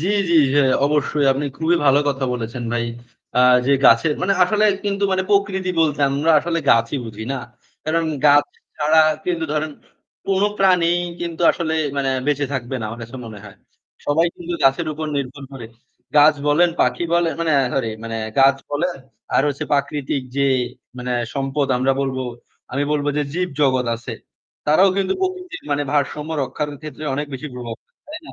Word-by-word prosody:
জ্বি, 175 - -1 0.2
জ্বি 170 - +4 0.2
যে 145 - +5 0.2
অবশ্যই 145 0 +1
আপনি 140 +2 -3
খুবই 165 +2 +2
ভালো 140 0 +5
কথা 135 -1 -1
বলেছেন 120 0 -4
ভাই। 120 0 0 0.5
আ - - +5 0.3
যে 140 - +4
গাছের 115 +7 +5
মানে 195 +2 +2
আসলে 210 +4 +2 0.2
কিন্তু 200 0 0
মানে 190 0 +1
প্রকৃতি 195 -2 +1
বলতে 150 -3 +1
আমরা 145 +4 +1
আসলে 165 +2 -2
গাছই 115 +4 +2
বুঝি 110 -1 -7
না। 135 - -2 0.5
কারণ 165 +1 0 0.2
গাছ 145 0 +6 0.3
ছাড়া 155 +1 +4 0.2
কিন্তু 170 -3 -1
ধরেন 155 0 -1 0.6
কোন 195 0 +1 0.2
প্রাণী 180 -3 +4 0.3
কিন্তু 170 -1 -4
আসলে 160 -2 -2 0.2
মানে 135 -1 0 0.2
বেঁচে 145 -1 +1
থাকবে 130 -1 -3
না - - -4
আমার 115 +2 -8
কাছে 115 +3 -9
মনে 110 -2 -9
হয়। 100 - -12 0.5
সবাই 160 +4 +3
কিন্তু 175 0 -6
গাছের 135 +5 +3
উপর 155 +1 -5
নির্ভর 140 +1 -5
করে। 125 -4 -8 0.5
গাছ 150 +1 +7
বলেন 160 +4 +4
পাখি - - +1
বলেন 170 -1 +2
মানে 165 -1 +1 0.2
সরি 130 -4 0 0.2
মানে 115 0 -4 0.2
গাছ 135 0 +6
বলেন 170 +5 -1 0.4
আর - - +4
হচ্ছে 140 -1 -3
প্রাকৃতিক 140 -1 -1
যে 140 0 +2 0.5
মানে 125 0 -3 0.2
সম্পদ 135 +1 -1
আমরা 130 +2 +2
বলব 135 -1 -2 0.6
আমি 140 +2 0
বলব 145 -1 -1
যে 150 - +2
জীব 180 +2 -1
জগৎ 130 -3 +2
আছে। 115 +1 -7 0.5
তারাও 155 +6 +5
কিন্তু 190 -1 +1
প্রকৃতির 370 -1 -4 0.3
ভারসাম্য 150 +1 -1
রক্ষার 150 +2 -3
ক্ষেত্রে 155 0 -8
অনেক 145 +2 -2
বেশি 140 +4 -6
প্রভাব 120 -2 -6
ফেলে - - -51
তাই 310 +1 -7
না। - - -10
145 Hz, 175 wpm, -20 LUFS, 135-170 Hz, 0.6 s, গাছ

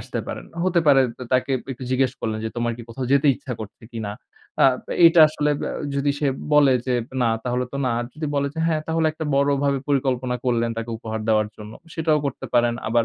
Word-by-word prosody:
আসতে - - -5
পারেন। - - -6 0.2
হতে 180 -2 +3
পারে 140 -2 +6 0.2
ত - - -17
তাকে 130 +1 +2 0.2
একটু 130 +1 -8
জিজ্ঞেস 130 -1 +2
করলেন 110 -1 -2
যে 110 - -2
তোমার 120 0 0
কি 120 - -9
কোথাও 125 +2 -4
যেতে 140 +1 +4
ইচ্ছা 135 -1 -7
করছে 110 +3 -9
কিনা? 110 -3 -4 0.5
আ - - +7 0.4
এইটা 165 0 +7
আসলে 150 -1 0
আব - - -8 0.3
যদি 140 +1 +1
সে 150 - 0 0.3
বলে 140 -3 +6
যে 125 - +1 0.3
না - - +3 0.2
তাহলে 125 0 0
তো - - -3
না, 125 - +1
আর 120 - -2
যদি 155 0 -4
বলে 140 0 +1
যে - - -7
হ্যা, 160 - +2
তাহলে 160 0 +1
একটা 160 0 -6
বড়ভাবে 140 0 +2
পরিকল্পনা 130 -3 0
করলেন 115 -2 +1
তাকে 115 0 -4
উপহার 110 -1 -5
দেওয়ার 110 -1 +3
জন্য, 105 0 -10 0.2
সেটাও 155 -2 +2
করতে 140 - -5
পারেন। 120 0 +3
আবার 115 0 +2
130 Hz, 215 wpm, -23 LUFS, 120-145 Hz, 0.5 s, আ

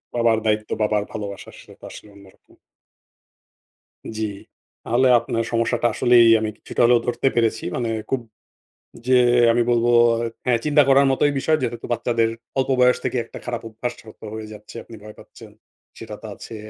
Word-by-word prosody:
বাবার 115 -2 +2
দায়িত্ব, 110 0 0
বাবার 105 -1 +1
ভালোবাসা, 100 -2 -7
সেটাতো - - -18
আসলে - - -12
অন্যরকম। 100 -1 -20 1.7
জি। 110 - -2 0.6
তাহলে 125 +3 +3
আপনার 115 0 -3
সমস্যাটা 115 0 0
আসলেই 120 -1 +5
আমি 110 0 -2
কিছুটা - - -4
হলেও 120 0 +5
ধরতে 120 +2 0
পেরেছি। 115 -1 0
মানে 120 -2 -2 0.2
খুব 135 -2 -1 0.9
যে 130 - +4 0.4
আমি 120 +1 +2
বলবো 120 0 +2 0.6
হ্যাঁ, 120 -2 +2
চিন্তা 150 0 +4
করার 140 0 +5
মতোই 145 +2 +2
বিষয় 155 +3 +1
যেহেতু 120 -1 -4
বাচ্চাদের 115 -1 0 0.3
অল্প 130 0 0
বয়স 125 0 +4
থেকে - - -2
একটা - - -11
খারাপ 120 -1 -4
অভ্যাসরত 115 0 -8
হয়ে 110 0 -7
যাচ্ছে। 105 +2 -12
আপনি 115 - -13
ভয় 105 0 -11
পাচ্ছেন। - - -15 0.5
সেটা - - -8
তো - - -8
আছে। 115 - -10
115 Hz, 155 wpm, -21 LUFS, 110-125 Hz, 1.7 s, আসলেই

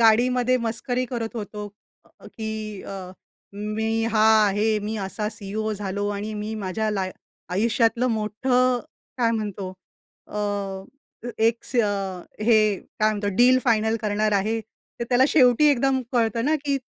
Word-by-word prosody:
गाडीमध्ये 245 +3 +4
मस्करी 245 +3 -1
करत 235 -2 -4
होतो 210 -1 -5 0.4
अ, - - -18
की 220 -1 -4 0.3
अ, 190 -2 -7 0.4
"मी 220 +2 -1
हा 215 0 +4 0.2
आहे, 210 +2 +1
मी 215 +2 -4
असा 210 +2 -3
सीईओ 215 +1 -4
झालो 205 0 -3
आणि 215 +2 -4
मी 210 +1 -4
माझ्या 215 +1 -2
लाय 190 -3 -1 0.4
आयुष्यातलं 230 +4 +2
मोठं 245 +3 +1 0.4
काय 230 -2 +3
म्हणतो 205 -4 -3 0.5
अ, - - -16
अ 205 +4 -5
एक 225 +1 +2
स - - -5 0.6
हे 215 -2 +4 0.2
काय 215 0 +4
म्हणतो 205 -1 -2
डील 255 +1 +6
फायनल 220 -2 +2
करणार 210 0 +1
आहे." 215 +3 +1 0.4
तर 235 - 0
त्याला 255 +1 +4
शेवटी 255 0 +5
एकदम 270 0 +2
कळतं 230 -1 +1
ना, 310 +2 +3
की 280 -1 +1
220 Hz, 140 wpm, -24 LUFS, 210-240 Hz, 0.6 s, डील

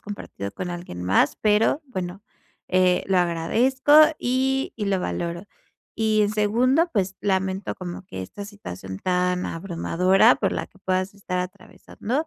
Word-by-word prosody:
compartido 200 - -7
con 175 - -5
alguien 175 - -6
más, 95 +9 +3
pero 215 +8 +2
bueno, 185 -5 -5 0.5
eh, 185 -1 +2
lo 190 -1 +2
agradezco 220 - +1 0.3
y 265 +2 0
y 210 -3 -3
lo 195 -1 +1
valoro, 170 - -3 0.5
y 220 -1 +2
en 205 - +1
segundo, 250 +10 +2
pues, 195 -3 0
lamento 190 -1 -1
como 175 0 -7
que 95 - -7
esta 200 - -8
situación 95 - -8
tan 180 - 0
abrumadora 180 +2 +3
por - - -1
la - - -3
que 190 - -25
puedas 185 +1 -1
estar 190 -2 -4
atravesando, 200 - -4
190 Hz, 145 wpm, -24 LUFS, 175-210 Hz, 0.5 s, más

